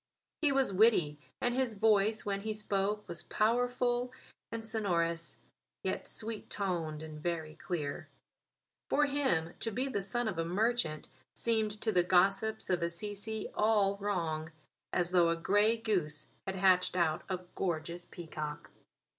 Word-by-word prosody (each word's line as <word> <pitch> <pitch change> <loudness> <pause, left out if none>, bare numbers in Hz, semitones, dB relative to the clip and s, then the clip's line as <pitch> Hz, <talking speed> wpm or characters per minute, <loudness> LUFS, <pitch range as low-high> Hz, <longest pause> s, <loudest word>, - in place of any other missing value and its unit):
He 300 -3 +4
was 270 -6 +2
witty, 180 -8 +4 0.2
and 245 - +1
his 255 -3 0
voice 215 0 +3
when 200 -1 -1
he 215 +1 -2
spoke 210 0 -1
was 170 0 -4
powerful 245 +2 +1 0.4
and 230 -1 -4
sonorous, 170 -7 0 0.5
yet - - -2
sweet 220 -1 -3
toned 165 -6 -2
and 155 -1 -8
very 160 -2 -2
clear. 155 -4 -4 0.8
For 295 - +4
him 265 - +1
to 225 - -1
be 250 +5 -1
the 205 -7 -1
son 225 +5 0
of 185 -6 -2
a - - +2
merchant 180 -3 0 0.3
seemed 220 -2 +1
to 220 - +1
the 180 -3 +4
gossips 195 +5 +2
of 180 - +2
Assisi 205 +5 -3
all 210 -2 +3
wrong 165 -6 -2 0.4
as 175 0 +1
though 175 -2 +5
a 165 - +2
grey 205 +6 +3
goose 180 -10 0 0.2
had 190 - -2
hatched 185 -1 +4
out 170 -1 +2
a 185 -1 -2
gorgeous 170 -1 -3
peacock. 155 -3 -6
195 Hz, 145 wpm, -32 LUFS, 170-220 Hz, 0.8 s, though